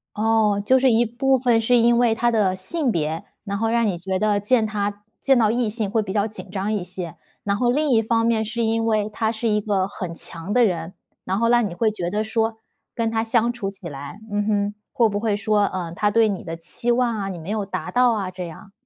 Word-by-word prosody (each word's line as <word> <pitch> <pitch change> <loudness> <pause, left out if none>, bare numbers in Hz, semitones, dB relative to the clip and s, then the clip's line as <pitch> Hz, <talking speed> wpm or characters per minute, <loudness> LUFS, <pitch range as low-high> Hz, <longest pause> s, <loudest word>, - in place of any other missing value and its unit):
哦， 215 -1 +2
就 260 +4 +5
是 260 0 +4
一 230 +1 +4
部 265 +4 +1
分 240 -2 +2
是 245 +2 +3
因 235 0 +4
为 235 -2 +3
她 240 +1 +1
的 200 -5 +2
性 265 - -1
别， 160 +1 -2 0.2
然 200 -1 -3
后 225 +2 0
让 235 -1 +2
你 185 -4 -1
觉 190 +2 -2
得 210 -1 +2
见 220 +2 +2
她 205 -1 -3 0.2
见 270 -1 +4
到 220 -3 +3
异 235 -2 0
性 215 -2 -2
会 220 +2 +1
比 195 -3 -5
较 205 -1 +2
紧 210 -3 -10
张 200 +2 -2
一 205 -4 -1
些。 180 -3 -7 0.3
然 200 0 0
后 240 +3 +1
另 300 +3 +1
一 230 -4 +4
方 230 +1 +1
面， 230 -1 +2
是 230 +2 -2
因 225 0 +1
为 215 -2 +1
她 220 +1 -1
是 230 +1 -2
一 210 -1 +2
个 200 -3 0
很 185 -4 -6
强 165 +3 -6
的 245 -1 +5
人， 170 -3 -2 0.3
然 190 - -1
后 230 - +2
让 240 -2 +4
你 - - -7
会 220 +2 +1
觉 180 -5 -3
得 210 +3 -1
说， 220 0 -1 0.4
跟 230 -1 0
她 225 0 0
相 230 +1 +1
处 205 -5 -4
起 195 -2 -9
来 145 +6 -8
嗯 205 0 0
哼， 205 -1 0 0.2
会 235 - +3
不 205 -1 -2
会 215 -2 0
说， 210 0 +1
呃， 175 -4 -4
她 205 +4 +1
对 225 0 +4
你 200 -3 -3
的 165 -1 -6
期 180 +8 -2
望 240 -1 +1
啊， 195 -2 -3
你 185 - -5
没 165 +2 -8
有 210 -1 -1
达 195 - -5
到 250 -1 +4
啊， 195 -4 -3
这 180 -1 -6
样。 195 +5 -12
215 Hz, 270 characters per minute, -22 LUFS, 195-230 Hz, 0.4 s, 就